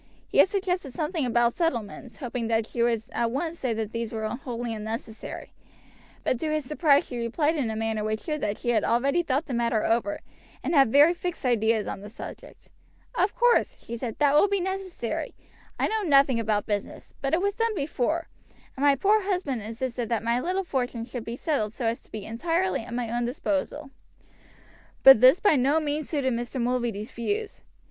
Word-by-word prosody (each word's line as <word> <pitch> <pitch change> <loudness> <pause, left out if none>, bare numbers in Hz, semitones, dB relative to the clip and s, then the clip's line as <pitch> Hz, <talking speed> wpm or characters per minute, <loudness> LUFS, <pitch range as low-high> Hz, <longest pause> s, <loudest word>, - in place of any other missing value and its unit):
He - - 0
had - - +8
suggested 365 - -2
something 310 -3 -1
about 240 0 +2
settlements, 235 - -3
hoping 245 -3 -3
that 225 -1 +1
she 235 - -4
would 230 -2 +2
at 235 - 0
once 320 +7 -3
say 255 - -1
that 220 -1 -3
these 230 -1 -3
were 220 -1 -2
wholly 240 -1 -4
unnecessary; 220 +1 -6 0.7
but 255 - 0
to 310 +2 -1
his 305 -2 -1
surprise 295 0 +3
she 245 - -6
replied 295 +7 0
in 270 -7 -1
a 220 - -3
manner 220 -1 -1
which 215 0 -2
showed 305 -2 -3
that 210 0 -1
she 240 - -3
had 225 -3 +2
already 275 +8 +2
thought 290 -1 -1
the 270 - -5
matter 235 -2 +1
over, 240 +7 0 0.4
and - - -1
had 270 -6 +5
very 295 +6 +7
fixed 350 -4 -5
ideas 225 -3 +2
on - - -5
the 205 - -9
subject. 220 - -11 0.4
"Of 375 +3 +1
course," 485 0 +3
she 235 - -7
said, 235 -2 -5
"that 290 -1 +3
will 300 +7 +6
be 400 0 0
necessary. 375 -8 -4 0.4
I - - +2
know 440 0 -1
nothing 275 - +4
about 215 -2 0
business, 205 -2 -4
but 275 +3 +1
it - - 0
was 405 0 +1
done 455 +1 0
before, 310 +1 -1 0.5
and 270 - -4
my 285 -1 +6
poor 415 +9 +3
husband 360 - -1
insisted 230 +2 -4
that 230 -3 0
my 235 +1 +1
little 370 +7 -1
fortune 245 -7 -2
should 240 -1 -6
be 230 - -4
settled 245 -7 -1
so 240 - -4
as 225 +1 -1
to - - -25
be 215 -2 -6
entirely 330 +11 0
at 235 +1 -9
my 240 -1 -2
own 240 0 0
disposal." 285 +1 -2 1.1
But 270 -4 +10
this 260 +7 +7
by 365 -8 +4
no 275 +5 +3
means 300 0 -3
suited 275 -5 0
Mr. 240 +3 -3
Mulready's 235 -3 -1
views. 410 - -3
255 Hz, 200 wpm, -26 LUFS, 230-315 Hz, 1.1 s, But